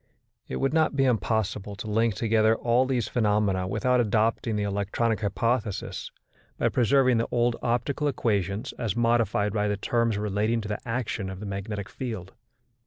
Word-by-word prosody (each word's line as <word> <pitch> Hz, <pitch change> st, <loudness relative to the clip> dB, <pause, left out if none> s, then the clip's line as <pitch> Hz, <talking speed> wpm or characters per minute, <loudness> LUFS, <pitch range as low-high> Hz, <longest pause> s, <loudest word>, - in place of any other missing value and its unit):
It -, -, -4 dB
would 135 Hz, -, 0 dB
not 160 Hz, -3 st, +2 dB
be 135 Hz, -1 st, +3 dB
impossible 110 Hz, -4 st, 0 dB
to 105 Hz, -, -7 dB
link 110 Hz, 0 st, +1 dB
together 110 Hz, -1 st, +3 dB
all 120 Hz, +3 st, +2 dB
these 125 Hz, -5 st, 0 dB
phenomena 105 Hz, -5 st, +1 dB
without 125 Hz, +5 st, +2 dB
adopting 110 Hz, 0 st, +1 dB
the 105 Hz, -, 0 dB
electronic 100 Hz, +2 st, -1 dB
hypothesis, 110 Hz, 0 st, -1 dB, 0.5 s
by -, -, +2 dB
preserving 125 Hz, 0 st, +3 dB
the 115 Hz, -, 0 dB
old 120 Hz, 0 st, +1 dB
optical 125 Hz, +5 st, 0 dB
equations 105 Hz, -3 st, -1 dB
as 115 Hz, -6 st, -1 dB
modified 115 Hz, -3 st, +2 dB
by 105 Hz, -1 st, +1 dB
the 105 Hz, -1 st, 0 dB
terms 115 Hz, +1 st, 0 dB
relating 105 Hz, +2 st, 0 dB
to 105 Hz, -, -6 dB
the 105 Hz, 0 st, -3 dB
action 115 Hz, -4 st, -2 dB
of 95 Hz, -1 st, -7 dB
the 105 Hz, -, -6 dB
magnetic 100 Hz, +1 st, -4 dB
field. 110 Hz, -7 st, -6 dB
110 Hz, 165 wpm, -26 LUFS, 105-120 Hz, 0.5 s, be